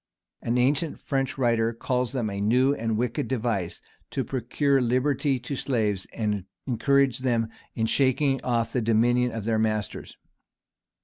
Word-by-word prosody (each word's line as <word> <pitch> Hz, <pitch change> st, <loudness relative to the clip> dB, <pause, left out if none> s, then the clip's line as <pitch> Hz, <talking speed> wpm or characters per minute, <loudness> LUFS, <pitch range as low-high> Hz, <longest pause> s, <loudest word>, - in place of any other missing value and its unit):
[] -, -, -57 dB
An 120 Hz, +1 st, 0 dB
ancient 140 Hz, +5 st, +1 dB
French 135 Hz, -1 st, -2 dB
writer 115 Hz, -3 st, +2 dB
calls 125 Hz, +1 st, -1 dB
them 125 Hz, -4 st, -1 dB
a 100 Hz, 0 st, -4 dB
new 125 Hz, +6 st, +3 dB
and 115 Hz, -5 st, -1 dB
wicked 125 Hz, +5 st, -1 dB
device, 115 Hz, -8 st, -2 dB, 0.3 s
to 135 Hz, -, -2 dB
procure 135 Hz, +2 st, +1 dB
liberty 130 Hz, +3 st, +1 dB
to 125 Hz, +3 st, -4 dB
slaves, 110 Hz, -8 st, -1 dB
and 105 Hz, -4 st, -2 dB, 0.2 s
encourage 135 Hz, +1 st, +2 dB
them 120 Hz, -3 st, 0 dB, 0.3 s
in 110 Hz, -, 0 dB
shaking 135 Hz, +2 st, +2 dB
off 120 Hz, -2 st, 0 dB
the 125 Hz, -, +1 dB
dominion 120 Hz, +2 st, +2 dB
of 110 Hz, -2 st, -5 dB
their 110 Hz, -1 st, +1 dB
masters. 110 Hz, -2 st, -2 dB
120 Hz, 150 wpm, -26 LUFS, 115-135 Hz, 0.3 s, new